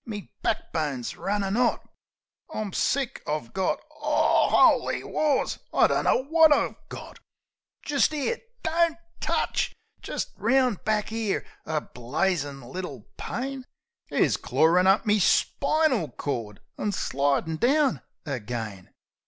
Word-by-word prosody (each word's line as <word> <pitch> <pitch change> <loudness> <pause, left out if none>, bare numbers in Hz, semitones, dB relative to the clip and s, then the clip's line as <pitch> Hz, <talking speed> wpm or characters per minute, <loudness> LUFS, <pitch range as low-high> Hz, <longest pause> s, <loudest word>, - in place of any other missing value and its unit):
"Me 210 -3 -7
back 225 - -2
bone's 145 -7 -2
runnin' 200 0 -1
'ot. 245 0 +1 0.6
I'm 215 - -4
sick! 270 -1 0
I've 150 -6 -3
got 190 -1 0 0.2
Oo, - - +3
'oly - - +4
wars! 295 -3 0
I - - +5
dunno 260 - +2
wot 320 0 +6
I've 295 - +3 0.2
got! - - -9 0.6
Jist 290 +1 +2
'ere 310 - -1 0.2
Don't 330 0 +2 0.2
touch! - - -1 0.3
Jist - - -4
round 255 -6 +2
back 215 -1 0
'ere, 225 -3 -1 0.2
a 155 -1 0
blazin' 140 +2 -2
little 135 - -7
pain 265 +1 -4 0.4
Is - - +2
clawin' 175 +4 +3
up 195 +4 +4
me 210 0 +3
spinal 265 - +2
cord 115 -8 -5 0.2
an' 205 - -1
slidin' 145 0 0
down 275 - +2 0.2
again." 110 - -5
200 Hz, 120 wpm, -26 LUFS, -, 0.6 s, wot